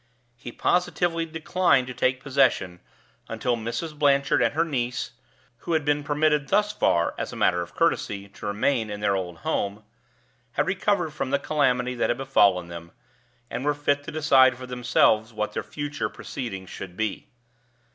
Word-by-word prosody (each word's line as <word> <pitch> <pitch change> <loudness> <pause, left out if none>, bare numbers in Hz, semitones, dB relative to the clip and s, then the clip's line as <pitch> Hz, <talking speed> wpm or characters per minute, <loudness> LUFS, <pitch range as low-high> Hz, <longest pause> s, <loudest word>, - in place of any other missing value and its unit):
He 120 0 -9
positively 175 +1 0
declined 160 -3 +2
to 130 - -7
take 130 +1 0
possession 130 -10 +1 0.5
until 125 - -1
Mrs. 115 +8 -4
Blanchard 140 -3 +3
and 120 +3 +1
her 165 +1 +2
niece 125 -7 -2 0.5
(who 170 - -4
had 155 -2 +1
been 145 0 +1
permitted 150 -1 +1
thus 210 +5 +2
far, 85 - +1
as - - -3
a - - -8
matter 90 -1 +2
of 85 - -8
courtesy, 100 0 0
to 100 +1 -9
remain 110 +3 0
in 105 0 -5
their 100 -1 +1
old 90 -3 -4
home) 100 +2 -1 0.7
had 150 - +1
recovered 190 -3 0
from 140 - -3
the 140 - +2
calamity 130 -4 +1
that 120 - 0
had 120 - +1
befallen 100 -10 +3
them, 85 -1 -9 0.6
and 125 - -5
were 145 0 +1
fit 145 0 0
to 165 - -6
decide 135 -5 +4
for 130 - -8
themselves 115 -2 +2
what 105 -1 -3
their - - -2
future 145 0 -4
proceedings 95 -8 -7
should 90 -2 -8
be. 110 -2 -3
130 Hz, 170 wpm, -25 LUFS, 110-150 Hz, 0.7 s, decide